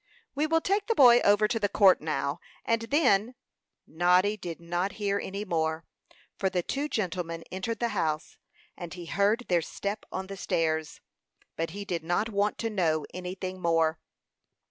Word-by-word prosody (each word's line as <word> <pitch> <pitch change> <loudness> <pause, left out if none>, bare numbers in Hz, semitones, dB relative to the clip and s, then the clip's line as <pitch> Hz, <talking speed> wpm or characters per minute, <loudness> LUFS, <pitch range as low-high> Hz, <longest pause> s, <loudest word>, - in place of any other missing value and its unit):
"We 295 +2 0
will 325 +1 +2
take 400 +3 0
the 455 - +1
boy 245 - +8
over 205 0 +4
to 225 - -1
the 205 -2 +1
court 195 -2 +5
now, 150 -2 -2 0.3
and 230 0 +1
then 250 -6 +3 0.3
" - - -60 0.2
Noddy 180 +5 +3
did 175 -5 -7
not 175 +3 -2
hear 200 -1 -1
any 200 +2 -5
more, 160 -3 -1 0.5
for 190 - +1
the 180 -2 -1
two 285 - -2
gentlemen 175 - -3
entered 190 +5 -3
the 235 +1 0
house, 160 -7 -2 0.4
and 175 -1 -8
he 175 -1 -8
heard 205 +8 +1
their 175 -2 +3
step 200 +5 -4
on 190 - -3
the 195 +1 -8
stairs. 160 -3 -1 0.5
But 165 0 -2
he 200 +4 -7
did 170 -4 -3
not 175 +7 0
want 205 0 0
to 225 - -2
know 160 -7 +1
anything 185 +1 -5
more. 165 -1 +2
190 Hz, 175 wpm, -28 LUFS, 170-215 Hz, 0.5 s, boy